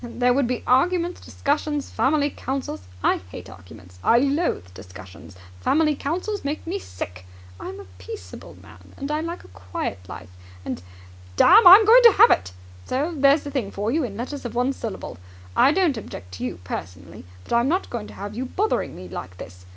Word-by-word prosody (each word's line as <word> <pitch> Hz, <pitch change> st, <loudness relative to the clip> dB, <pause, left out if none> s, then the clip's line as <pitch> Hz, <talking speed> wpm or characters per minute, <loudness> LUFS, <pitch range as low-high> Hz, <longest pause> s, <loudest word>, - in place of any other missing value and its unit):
There 245 Hz, +1 st, +1 dB
would 270 Hz, -1 st, +1 dB
be 250 Hz, 0 st, -3 dB
arguments, 345 Hz, +7 st, +1 dB
discussions, 295 Hz, 0 st, -2 dB
family 290 Hz, +1 st, +1 dB
councils! 260 Hz, -, -5 dB, 0.2 s
I -, -, +3 dB
hate 90 Hz, +1 st, -10 dB
arguments! 90 Hz, 0 st, -15 dB
I 235 Hz, -, +5 dB
loathe 275 Hz, -, 0 dB
discussions! 95 Hz, 0 st, -12 dB, 0.2 s
Family 305 Hz, -, +2 dB
councils 365 Hz, +10 st, -3 dB
make 285 Hz, +2 st, -4 dB
me 370 Hz, +4 st, -3 dB
sick! 90 Hz, -, -8 dB, 0.3 s
I'm 95 Hz, +1 st, -7 dB
a 100 Hz, -, -10 dB
peaceable 90 Hz, 0 st, -10 dB
man, 90 Hz, +1 st, -17 dB
and 275 Hz, +2 st, -5 dB
I 305 Hz, +1 st, -1 dB
like 335 Hz, +2 st, -6 dB
a -, -, -15 dB
quiet 90 Hz, +1 st, -5 dB
life! 90 Hz, -, -9 dB, 0.3 s
And, -, -, -4 dB, 0.5 s
damme, 395 Hz, -, +7 dB
I'm 395 Hz, +4 st, +10 dB
going 475 Hz, +4 st, +8 dB
to 470 Hz, -2 st, +9 dB
have -, -, +8 dB
it. 95 Hz, +1 st, +1 dB, 0.3 s
So 290 Hz, +7 st, -2 dB
there's 280 Hz, +1 st, +4 dB
the 285 Hz, -, -6 dB
thing 260 Hz, -8 st, -2 dB
for 205 Hz, +3 st, -3 dB
you 310 Hz, +3 st, +1 dB
in 205 Hz, -5 st, -5 dB
letters 265 Hz, +4 st, -5 dB
of 240 Hz, -2 st, -6 dB
one 250 Hz, +3 st, +1 dB
syllable. 215 Hz, -, -7 dB, 0.4 s
I 275 Hz, -, +5 dB
don't 335 Hz, -4 st, +2 dB
object 90 Hz, -, -9 dB
to 90 Hz, -, -7 dB
you 125 Hz, -, -4 dB
personally, 90 Hz, -2 st, -8 dB, 0.2 s
but -, -, -6 dB
I'm 235 Hz, +2 st, +3 dB
not 360 Hz, +6 st, -1 dB
going 230 Hz, -3 st, -5 dB
to -, -, -13 dB
have 205 Hz, +1 st, -7 dB
you 255 Hz, +3 st, -3 dB
bothering 415 Hz, -, -1 dB
me 90 Hz, -, -9 dB
like 90 Hz, 0 st, -8 dB
this. 90 Hz, +1 st, -12 dB
245 Hz, 190 wpm, -23 LUFS, -, 0.5 s, I'm